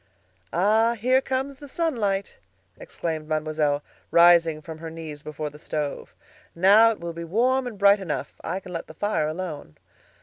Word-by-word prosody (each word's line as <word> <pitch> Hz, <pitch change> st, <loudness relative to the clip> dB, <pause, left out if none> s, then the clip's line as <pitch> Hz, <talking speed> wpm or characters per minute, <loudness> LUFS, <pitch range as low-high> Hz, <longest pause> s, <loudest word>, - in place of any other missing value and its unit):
"Ah! 220 Hz, +6 st, +3 dB
here 255 Hz, +4 st, +3 dB
comes 265 Hz, +1 st, -3 dB
the 290 Hz, -, -11 dB
sunlight!" 230 Hz, -, -1 dB, 0.4 s
exclaimed 160 Hz, -2 st, -5 dB
Mademoiselle, 155 Hz, -2 st, 0 dB, 0.3 s
rising 170 Hz, -2 st, +5 dB
from 160 Hz, +1 st, -9 dB
her 165 Hz, 0 st, -6 dB
knees 160 Hz, -2 st, -8 dB
before 150 Hz, 0 st, -5 dB
the 150 Hz, -, -14 dB
stove. 150 Hz, -2 st, -4 dB, 0.4 s
"Now 200 Hz, +6 st, +6 dB
it 225 Hz, -, -3 dB
will 170 Hz, 0 st, -5 dB
be 170 Hz, +1 st, -6 dB
warm 250 Hz, +9 st, +1 dB
and 225 Hz, -4 st, -7 dB
bright 200 Hz, +1 st, +5 dB
enough; 180 Hz, -6 st, -4 dB
I 190 Hz, -, -3 dB
can 180 Hz, -, -10 dB
let 165 Hz, -, -5 dB
the 160 Hz, -, -12 dB
fire 205 Hz, -5 st, 0 dB
alone." 155 Hz, -, -6 dB
175 Hz, 165 wpm, -25 LUFS, 155-220 Hz, 0.4 s, Now